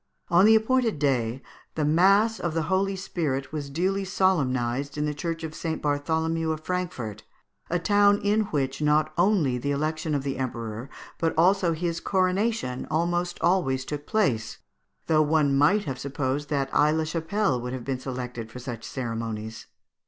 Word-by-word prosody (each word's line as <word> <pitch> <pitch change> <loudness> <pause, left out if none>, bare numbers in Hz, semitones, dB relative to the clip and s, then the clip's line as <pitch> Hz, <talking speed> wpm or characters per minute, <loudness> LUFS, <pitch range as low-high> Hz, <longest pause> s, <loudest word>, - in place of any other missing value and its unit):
On 175 +3 +5
the 220 +1 +7
appointed 225 -2 +2
day, 130 -3 0 0.3
the 155 - 0
mass 195 +8 +4
of 170 -2 -2
the 165 - +1
Holy 195 +1 +1
Spirit 155 -8 -3
was 145 -2 -4
duly 190 +7 0
solemnized 140 -9 0
in 150 - 0
the 150 - -1
Church 165 +2 -4
of 160 -1 -5
St. 160 0 -3
Bartholomew 160 +2 0
of 155 -1 -4
Frankfort, 155 - -4 0.5
a 175 - +1
town 205 +3 +4
in 210 +1 +2
which 140 -6 -2
not 150 +1 +2
only 170 -9 +2
the 140 - -3
election 155 +2 -1
of 140 - -1
the 140 -1 -3
Emperor, 115 -1 -4 0.3
but 165 -1 0
also 180 0 +4
his 170 +1 -2
coronation, 185 - 0
almost 175 +2 0
always 135 -8 +1
took 145 +1 -6
place, 130 - 0 0.5
though 155 -1 +3
one 150 -2 +2
might 160 +10 +4
have 130 -2 -4
supposed 140 +1 -2
that 140 -2 0
Aix 150 +1 +4
la 160 - +1
Chapelle 165 - -1
would 125 +1 -4
have 130 -2 -6
been 135 -2 -2
selected 125 -3 -5
for 125 - -9
such 120 -2 -6
ceremonies. 115 -3 -5
155 Hz, 165 wpm, -26 LUFS, 135-180 Hz, 0.5 s, the